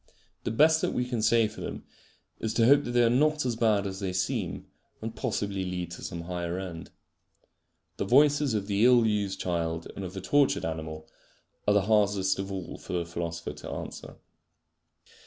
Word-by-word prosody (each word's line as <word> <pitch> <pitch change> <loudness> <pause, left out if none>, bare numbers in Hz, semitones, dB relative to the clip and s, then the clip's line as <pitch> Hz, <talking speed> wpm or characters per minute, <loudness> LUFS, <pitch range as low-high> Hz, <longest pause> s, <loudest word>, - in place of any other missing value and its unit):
The - - 0
best 155 +7 +4
that - - 0
we 125 - 0
can 125 -3 -2
say 115 0 +4
for - - -10
them - - -6 0.6
is 110 0 -2
to 115 - +4
hope 140 +3 +5
that - - -4
they 120 0 +5
are - - +5
not 150 +3 +2
as 120 -2 0
bad 110 -3 +2
as 95 -1 -4
they 95 -2 -3
seem, 95 0 -2 0.3
and 115 +1 -6
possibly 100 -7 -2
lead 90 -2 -4
to 90 - -8
some 85 - -5
higher 85 0 -3
end. 90 -3 -6 1.1
The - - -1
voices 145 +2 +4
of 100 -2 -1
the 100 +1 +1
ill 120 -1 +6
used 100 -3 0
child 85 -2 -2
and 100 - -5
of 90 -1 -6
the 95 - -5
tortured 145 +8 +2
animal 80 -1 -5 0.6
are 105 - +4
the 100 - +5
hardest 100 -2 +2
of 95 0 -4
all 95 -3 -6
for - - -8
the 85 -1 0
philosopher 85 0 -4
to - - -9
answer. - - -7
100 Hz, 195 wpm, -28 LUFS, 90-120 Hz, 1.1 s, ill